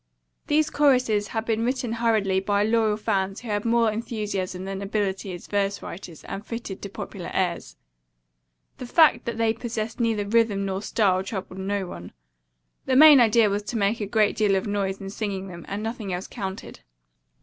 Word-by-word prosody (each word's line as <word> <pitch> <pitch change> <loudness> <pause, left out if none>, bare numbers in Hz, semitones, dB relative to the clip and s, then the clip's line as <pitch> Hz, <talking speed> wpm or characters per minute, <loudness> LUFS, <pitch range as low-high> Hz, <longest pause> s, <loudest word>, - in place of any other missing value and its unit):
These 305 +1 +2
choruses 250 -8 +3
had 225 -1 -3
been 225 0 0
written 250 -1 -1
hurriedly 220 -5 +1
by 200 +1 +1
loyal 220 -1 +2
fans 195 -2 -1
who 240 - -8
had 205 0 -1
more 230 -1 +3
enthusiasm 205 -5 -3
than 195 0 -4
ability 195 -1 -2
as 175 -1 -8
verse 200 -1 -1
writers, 170 -2 -9
and 200 - -6
fitted 230 -4 -6
to 200 - -6
popular 190 -2 -7
airs. 180 -2 -1 1.0
The 250 - -6
fact 300 -3 +4
that 235 -1 -3
they 225 -1 +2
possessed 225 -1 -4
neither 225 -3 +1
rhythm 210 -2 +2
nor 190 0 -2
style 195 -3 +1
troubled 190 -1 -6
no 195 0 -2
one. 90 - -9 0.7
The 260 - +2
main 295 0 +9
idea 230 -1 +5
was 205 0 0
to 225 +3 -4
make 210 +2 +1
a 205 - -2
great 210 0 +2
deal 210 -3 +2
of 190 - -1
noise 200 -2 -2
in 195 0 -7
singing 195 -2 -4
them, 175 -2 -9
and 205 +2 -4
nothing 225 -3 -4
else 180 +1 -3
counted. 195 - -7
210 Hz, 180 wpm, -25 LUFS, 195-230 Hz, 1.0 s, main